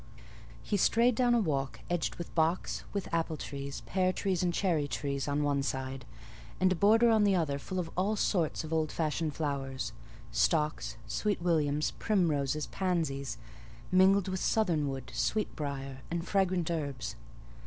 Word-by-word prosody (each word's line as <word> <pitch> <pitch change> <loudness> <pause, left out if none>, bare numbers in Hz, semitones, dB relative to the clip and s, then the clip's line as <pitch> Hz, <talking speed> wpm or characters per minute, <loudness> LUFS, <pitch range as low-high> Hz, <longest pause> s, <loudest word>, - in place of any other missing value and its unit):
He 205 - 0
strayed 235 +5 +4
down 240 +1 +3
a - - +4
walk 140 -9 -1
edged 175 -2 -1
with 170 - -7
box, 165 +2 0
with 200 -2 -3
apple 165 -1 0
trees, 140 -1 -6
pear 185 -1 +1
trees, 185 -2 -1
and 180 -1 +2
cherry 170 -5 +1
trees 140 -1 -2
on 145 +1 +1
one 145 -1 +1
side, 130 -1 -3 0.5
and 185 0 +4
a - - +3
border 225 +6 +5
on 220 -2 +4
the 200 -2 +4
other 145 -5 0
full 185 +6 -5
of 170 -3 -2
all 195 +5 +1
sorts 175 -7 0
of 160 +1 -5
old 155 -1 +1
fashioned 155 -1 -1
flowers, 135 -3 -3 0.4
stocks, 150 -6 +1
sweet 205 - -1
williams, 155 -4 +1
primroses, 155 - +1
pansies, 160 -8 -1 0.5
mingled 190 +1 +5
with 185 0 -2
southernwood, 150 - 0
sweet 215 -1 0
briar, 135 -2 -4
and 170 0 -1
various - - -9
fragrant 185 -4 +2
herbs. 140 -8 -3
165 Hz, 160 wpm, -31 LUFS, 140-185 Hz, 0.5 s, border